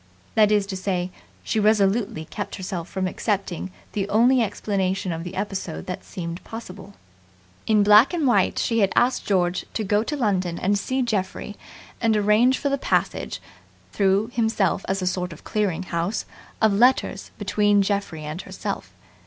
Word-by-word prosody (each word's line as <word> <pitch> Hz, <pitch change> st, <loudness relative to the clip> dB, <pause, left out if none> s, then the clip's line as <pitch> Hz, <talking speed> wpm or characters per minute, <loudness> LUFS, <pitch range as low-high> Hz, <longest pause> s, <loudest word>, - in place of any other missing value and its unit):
That 215 Hz, -1 st, +4 dB
is 205 Hz, -2 st, +3 dB
to 195 Hz, -1 st, -5 dB
say, 185 Hz, -1 st, -2 dB, 0.3 s
she 220 Hz, -, 0 dB
resolutely 205 Hz, -4 st, +2 dB
kept 205 Hz, -, -5 dB
herself 180 Hz, -3 st, -5 dB
from 190 Hz, -1 st, -2 dB
accepting 190 Hz, -2 st, -2 dB, 0.2 s
the 200 Hz, -1 st, -2 dB
only 245 Hz, +4 st, +4 dB
explanation 195 Hz, -3 st, -1 dB
of 165 Hz, 0 st, -4 dB
the 180 Hz, +1 st, -7 dB
episode 195 Hz, -4 st, -4 dB
that 180 Hz, -, -5 dB
seemed 170 Hz, -2 st, -6 dB
possible. 200 Hz, -3 st, -9 dB, 0.7 s
In 215 Hz, -2 st, +4 dB
black 210 Hz, +5 st, +7 dB
and 335 Hz, -4 st, 0 dB
white 245 Hz, -, +3 dB
she 230 Hz, -1 st, +1 dB
had 195 Hz, -2 st, +3 dB
asked 245 Hz, +1 st, +2 dB
George 180 Hz, -3 st, +1 dB
to 220 Hz, -, 0 dB
go 205 Hz, +1 st, +2 dB
to 295 Hz, +6 st, -3 dB
London 185 Hz, -8 st, 0 dB
and 200 Hz, +2 st, +1 dB
see 260 Hz, +6 st, -1 dB
Geoffrey 205 Hz, -2 st, -2 dB, 0.5 s
and 225 Hz, -2 st, +3 dB
arrange 215 Hz, +5 st, +4 dB
for 285 Hz, -, -1 dB
the 275 Hz, 0 st, 0 dB
passage -, -, -1 dB, 0.5 s
through 200 Hz, +3 st, +2 dB
himself 220 Hz, -5 st, +1 dB
as 190 Hz, 0 st, 0 dB
a -, -, -1 dB
sort 180 Hz, -1 st, -1 dB
of 155 Hz, -, -14 dB
clearing 195 Hz, -5 st, -1 dB
house 175 Hz, +4 st, -2 dB, 0.4 s
of 220 Hz, -2 st, +5 dB
letters 235 Hz, -3 st, +2 dB
between 205 Hz, 0 st, +2 dB
Geoffrey 195 Hz, -6 st, -2 dB
and 155 Hz, +4 st, -5 dB
herself. -, -, -5 dB
200 Hz, 165 wpm, -24 LUFS, 185-220 Hz, 0.7 s, black